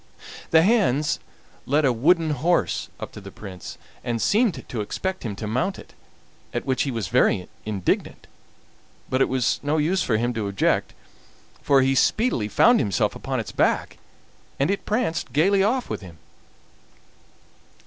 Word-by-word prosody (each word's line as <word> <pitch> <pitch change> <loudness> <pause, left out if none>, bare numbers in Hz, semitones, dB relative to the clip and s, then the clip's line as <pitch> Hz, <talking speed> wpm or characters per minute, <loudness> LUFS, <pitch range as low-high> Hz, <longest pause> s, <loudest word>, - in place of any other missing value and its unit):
The 160 0 +5
hands 180 - +2 0.5
led 145 +3 +2
a 130 - +3
wooden 160 +6 +3
horse 160 +5 0
up - - -6
to - - -10
the 100 - -9
Prince, 95 -3 -9 0.3
and 120 -1 -2
seemed 215 - +1
to 115 - -3
expect 190 - -3
him 110 -5 -4
to 105 - -6
mount 125 - -1
it, - - -13 0.6
at - - -2
which 130 -1 0
he 140 - 0
was 115 -7 -3
very 105 -6 +2 0.2
indignant; 100 -4 -2 0.9
but 130 +1 +1
it - - +3
was 130 -2 +1
no 145 +2 0
use 170 +5 +1
for 110 -9 +1
him 120 +2 0
to 110 -3 -2
object, 100 -1 0 0.7
for 135 -2 +4
he 135 +1 +2
speedily 135 - +2
found 235 - +5
himself 100 -7 0
upon - - -3
its - - -5
back, - - 0 0.6
and 140 +7 +2
it 200 - -3
pranced 210 -7 -1
gaily 195 +7 +3
off 245 +5 +1
with - - -4
him. 85 -4 -12
135 Hz, 160 wpm, -24 LUFS, 110-180 Hz, 0.9 s, The